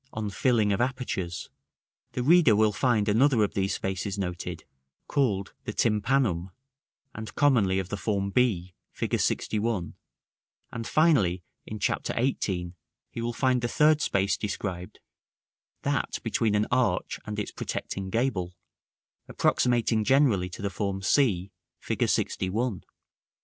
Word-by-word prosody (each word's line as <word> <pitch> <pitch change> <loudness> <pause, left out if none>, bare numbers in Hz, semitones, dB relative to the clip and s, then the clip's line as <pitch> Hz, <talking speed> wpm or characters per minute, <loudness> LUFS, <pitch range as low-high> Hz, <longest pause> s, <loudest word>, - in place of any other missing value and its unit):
on 110 -2 -3
Filling 110 -1 +2
of 100 - 0
Apertures, 120 -9 -3 0.6
the 125 - -2
reader 155 -5 +6
will 110 0 +4
find 110 -2 +1
another 115 +2 +4
of 105 - -1
these 95 -2 0
spaces 95 +1 -3
noted, 90 -3 -4 0.4
called 105 -9 0
the - - -4
tympanum, 105 -5 +1 0.6
and 110 +1 -8
commonly 115 -10 +3
of 95 -1 -2
the 105 - -3
form 100 0 -1
b, 95 -7 +1 0.2
Fig. - - -4
LXI.: 105 -6 0 0.8
and 115 0 -5
finally, 115 - +3 0.2
in 110 - -5
Chapter 105 - -1
XVIII., 95 -8 -1 0.4
he 115 - -5
will 120 +1 -1
find 125 0 +1
the 120 - 0
third 150 +4 +3
space 100 +1 +1
described, 95 -3 -5 0.8
that - - -1
between 110 -2 +1
an 105 +1 +2
arch 120 -8 +1
and 105 -1 -5
its 105 - -3
protecting 95 -1 -4
gable, 95 -6 -1 0.7
approximating 120 -3 +2
generally 125 -8 +3
to 90 - -9
the 100 - -1
form 100 -1 -3
c, 100 -6 +2 0.3
Fig. - - -4
LXI. 95 - 0
§ 115 0 -1
IX. - - -23
105 Hz, 140 wpm, -27 LUFS, 95-125 Hz, 0.8 s, reader